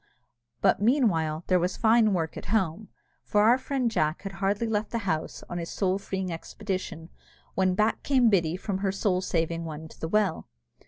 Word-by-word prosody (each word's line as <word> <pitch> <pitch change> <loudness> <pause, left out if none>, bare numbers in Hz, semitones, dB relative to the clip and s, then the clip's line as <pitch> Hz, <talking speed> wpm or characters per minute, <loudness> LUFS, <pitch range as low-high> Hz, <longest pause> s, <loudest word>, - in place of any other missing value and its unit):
But, - - +3
meanwhile, 175 - +2
there 185 -1 +3
was 180 +2 -1
fine 225 -1 +4
work 165 -4 -1
at - - -7
home; 200 -1 -1 0.3
for 210 0 +2
our 240 +4 +5
friend 260 -3 -1
Jack 155 -3 0
had 195 - -4
hardly 195 +4 -1
left 215 -1 -1
the 235 - -2
house 160 -4 -2
on 175 - -4
his 170 - -5
soul 190 -1 0
freeing 190 -2 -3
expedition, 180 -1 -5 0.4
when 185 -1 +2
back 215 +2 +1
came 260 -4 +3
Biddy 175 -5 +2
from 190 0 -3
her 195 -1 0
soul 190 -1 0
saving 165 -2 -1
one 160 -1 -7
to - - -16
the 160 - -3
well. 210 +3 0
190 Hz, 190 wpm, -27 LUFS, 170-215 Hz, 0.4 s, our